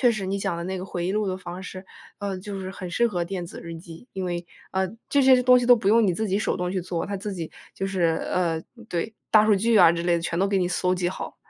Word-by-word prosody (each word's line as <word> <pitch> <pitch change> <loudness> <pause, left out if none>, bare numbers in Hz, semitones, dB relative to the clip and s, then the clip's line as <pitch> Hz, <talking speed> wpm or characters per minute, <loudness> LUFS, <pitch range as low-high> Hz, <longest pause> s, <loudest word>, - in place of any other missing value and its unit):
确 245 -2 +5
实 195 -3 -3
你 195 +1 -1
讲 195 -3 -2
的 170 - -4
那 190 +1 -3
个 185 - -5
回 175 -1 -3
忆 190 - 0
录 215 0 0
的 185 - -2
方 180 0 -8
式， 185 +1 -8 0.3
呃， 200 -2 -3
就 200 +1 -6
是 190 0 -5
很 185 -2 -7
适 235 +7 +2
合 175 -6 -1
电 175 -1 -4
子 - - -9
日 165 0 -7
记， 165 +8 -12
因 190 -1 -3
为， 175 -1 -3 0.3
呃， 190 0 +1 0.2
这 285 -1 +4
些 260 -1 +6
东 250 0 +7
西 245 - -1
都 245 0 +8
不 215 -4 0
用 225 0 +5
你 180 - +2
自 220 +5 -1
己 195 +1 +1
手 215 - 0
动 180 0 -2
去 185 - -1
做， 175 -1 -3
它 200 - -3
自 200 +1 -5
己 165 -3 -5 0.2
就 195 - -2
是， 190 -2 -2 0.3
呃 165 -3 0 0.3
对， 175 +6 -3 0.2
大 215 -1 +6
数 215 - +5
据 225 +3 +2
啊 165 - +8
之 170 0 -2
类 175 0 +2
的， 170 - -2
全 170 0 -2
都 195 - +3
给 195 -1 +2
你 180 - +1
搜 185 0 +1
集 175 -1 0
好。 190 - -6
190 Hz, 320 characters per minute, -25 LUFS, 175-205 Hz, 0.3 s, 都